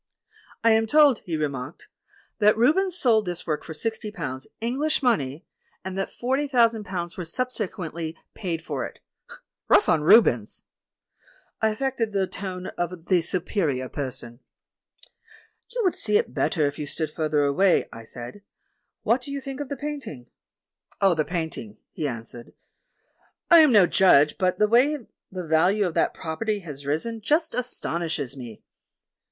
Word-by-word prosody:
"I 230 - +5
am 220 0 +3
told," 290 -2 +5
he 165 -3 -2
remarked, 140 -4 -4 0.5
"that 210 +1 +4
Rubens 355 +10 +2
sold 225 - +3
this 175 -1 -4
work 155 -3 -2
for 160 - -8
sixty 220 +5 -3
pounds, 150 - -6
English 275 +7 -1
money, 155 - 0 0.4
and 190 0 -4
that 195 0 -3
forty 265 +4 -1
thousand 230 -5 +2
pounds 175 -2 -5
were 180 - -3
subsequently 170 -6 -4 0.2
paid 170 -5 -4
for - - -3
it. - - -7 0.7
Kough - - +5
on 160 - +3
Rubens!" 150 - +4 1.0
I 220 - +3
affected 225 -1 -2
the 195 -1 +1
tone 185 -1 -6
of 175 -1 -3
the 180 -3 +4
Superior 165 - -1
Person. 125 -4 -5 1.3
"You - - -3
would 370 - +2
see 210 -1 +2
it - - -2
better 160 -8 +1
if 145 0 -3
you 150 - -4
stood 155 +1 -3
further 155 -2 0
away," 170 +7 +3
I 115 - -9
said; 120 - -9 0.6
"what 245 +3 +2
do 255 - -9
you 280 0 -3
think 270 0 -7
of 290 -2 -5
the 280 - -4
paint 295 0 -5
ing?" 125 -5 -8 0.7
"Of 195 -3 +4
the 155 -1 0
painting," 160 - -5
he 155 - -3
answered, 120 -1 -7 1.0
"I 340 - +10
am 305 -4 +7
no 205 -5 +7
judge, 150 -6 +4
but 185 -1 +1
the 210 - +3
way 250 +4 +3 0.3
the 185 -2 -5
value 180 +6 +3
of 175 - -2
that - - +1
property 205 +6 -3
has 145 -5 -9
risen 220 +10 -2
just 315 +7 +1
astonishes 165 - -2
me." 120 -5 -10
185 Hz, 160 wpm, -25 LUFS, 155-235 Hz, 1.3 s, I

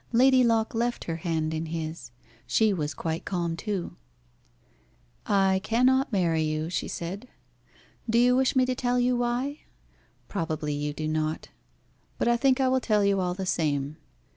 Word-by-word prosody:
Lady 255 +2 +5
Locke 225 -2 +2
left 240 +1 -1
her 165 -1 -3
hand 160 -2 -2
in 160 +1 -3
his. 160 -5 -5 0.4
She 220 -2 +3
was 150 -5 -3
quite 160 +2 -3
calm 170 -3 -2
too. 195 0 -4 1.3
"I 195 -1 +3
cannot 255 +5 +2
marry 170 -6 +1
you," 155 +1 -2
she - - -2
said. 190 +8 -5 0.8
"Do 230 - +3
you 245 +1 +5
wish 265 +1 +2
me 255 -1 +4
to 255 - 0
tell 245 0 0
you 250 0 +2
why? 245 +4 -1 0.7
Probably 160 -5 -2
you 145 0 -2
do 155 +1 -4
not; 155 0 -2 0.7
but - - 0
I 240 - +4
think 260 +2 +2
I 265 - +3
will 260 0 +3
tell 210 -4 +2
you 200 -1 +2
all 180 -1 -1
the 190 0 -4
same. 150 -4 -1
195 Hz, 165 wpm, -27 LUFS, 160-245 Hz, 1.3 s, Lady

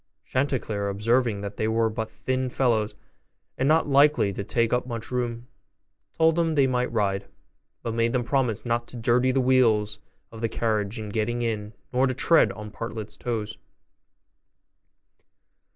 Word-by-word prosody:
Chanticleer 120 -7 -1
observing 110 +1 +1
that 100 0 -6
they 110 - 0
were 115 0 +2
but 110 0 -3
thin 130 +2 -2
fellows, 115 -5 +1 0.6
and 130 - 0
not 160 +1 +3
likely 140 -7 +4
to 100 - -4
take 115 +3 0
up 125 +1 0
much 115 -1 -5
room, 120 -1 -2 0.7
told 160 0 +4
them 165 -2 +1
they 140 -2 +4
might 125 -1 0
ride, 100 -3 0 0.6
but 115 - -2
made 115 0 +1
them 125 -1 0
promise 120 -3 0
not 120 0 -1
to 125 - -9
dirty 125 +2 +2
the 135 - +1
wheels 115 -5 +3 0.3
of 115 -1 -10
the 115 - 0
carriage 110 -1 -1
in 110 -1 -5
getting 115 +3 -1
in, 110 -2 -3 0.2
nor 130 +2 +3
to 130 - -2
tread 145 -6 +4
on 105 +1 -8
Partlet's 110 -2 -6
toes. 110 -3 -4
115 Hz, 160 wpm, -25 LUFS, 110-130 Hz, 0.7 s, likely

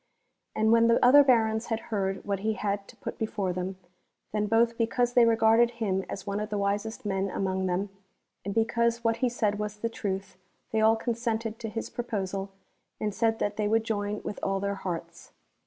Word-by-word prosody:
And 220 0 +3
when 230 0 +5
the 230 - +5
other 285 +3 +8
Barons 225 -3 +2
had 225 -1 -1
heard 195 -1 -1
what 200 -1 -1
he 220 +2 0
had 200 0 -2
to - - -14
put - - -7
before 205 -4 -1
them, 185 +1 -4 0.5
then 210 0 0
both 230 +1 +3
because 240 +1 +1
they 245 -1 +6
regarded 230 +1 +4
him 195 -4 0
as 195 - -6
one 200 0 -2
ot 210 - -4
the 210 - -2
wisest 205 +3 -2
men 195 -1 0
among 190 0 -1
them, 185 +3 -1 0.5
and 200 - -3
because 235 +1 +1
what 230 0 +2
he 250 +1 +1
said 210 -3 0
was 210 0 -4
the 230 +2 -2
truth, 195 -4 -4 0.3
they 220 - +1
all 220 +1 +5
consented 225 -1 -2
to 225 - -4
his 225 +2 -5
proposal 195 -5 -3 0.5
and 210 -1 -2
said 225 +1 +1
that 205 -1 -2
they 210 -1 +1
woidd 225 +1 +2
join 210 -2 -2
with 210 - -5
all 195 0 0
their 200 +1 -1
hearts. 180 -4 -6
215 Hz, 200 wpm, -28 LUFS, 200-230 Hz, 0.5 s, other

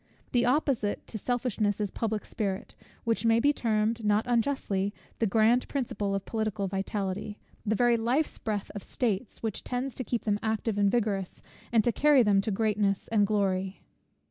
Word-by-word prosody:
The 245 -1 +3
opposite 255 -6 +1
to 215 - -6
selfishness 225 -4 0
is 205 -3 -1
public 220 -2 -2
spirit; 195 -3 -3 0.3
which 230 0 0
may 230 0 +4
be 285 +4 +4
termed, 225 -2 0
not 210 +1 +2
unjustly, 230 -5 0 0.2
the 225 - +2
grand 225 +4 +3
principle 205 -7 -2
of 195 - -3
political 215 -3 -2
vitality, 195 +1 -3 0.3
the 220 - +2
very 240 +1 +4
life's 250 +7 0
breath 210 -2 -3
of 205 - -5
states, 220 -1 -2
which 220 -3 -3
tends 255 +1 -3
to 255 - -4
keep 235 -3 -2
them 205 -1 0
active 220 -1 -1
and 200 -1 +4
vigorous, 200 -4 -1 0.3
and 225 -2 +4
to 240 - +2
carry 290 0 +5
them 200 -2 +4
to 220 - -3
greatness 205 -1 0
and 210 -3 +3
glory. 195 -2 0
215 Hz, 170 wpm, -29 LUFS, 200-235 Hz, 0.3 s, carry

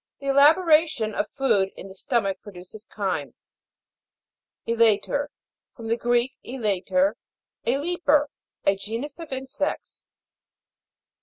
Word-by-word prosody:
The 275 0 -4
elaboration 305 - +4
of 205 - -2
food 200 -8 +1
in - - -8
the 190 - -11
stomach 195 -1 -1
produces 205 +2 -12
chyme. 180 - -3 1.3
E'LATER. 230 +5 +2 0.5
From 225 -2 -7
the 230 - +3
Greek, 240 +2 +1
elater, 245 +4 0 0.5
a - - +3
leaper. 300 -2 +1 0.3
A 195 - +4
genus 230 - -6
of 330 -4 -9
insects. 265 +2 -4
240 Hz, 105 wpm, -25 LUFS, 205-285 Hz, 1.3 s, elaboration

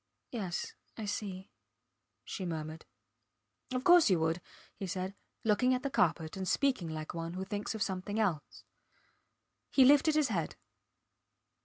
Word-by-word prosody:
Yes... 195 -8 -3 0.2
I 220 - -4
see, 195 -2 -4 0.7
she 190 - -5
murmured. 160 -2 -5 0.8
Of 255 0 -1
course 350 -5 +7
you 180 -3 +4
would, 165 +2 +1 0.3
he 195 - -5
said, 185 +1 -3 0.3
looking 250 +4 +3
at 250 - -3
the 275 - -2
carpet 160 -11 +1
and 190 -1 -3
speaking 260 -11 +1
like 155 -1 -5
one 165 0 -4
who 190 +1 -3
thinks 205 +2 -3
of 220 - 0
something 195 +3 -3
else. 180 -9 -1 1.1
He 265 - +6
lifted 290 +3 +6
his 305 -4 +3
head. 170 -7 -1
195 Hz, 145 wpm, -32 LUFS, 170-250 Hz, 1.1 s, course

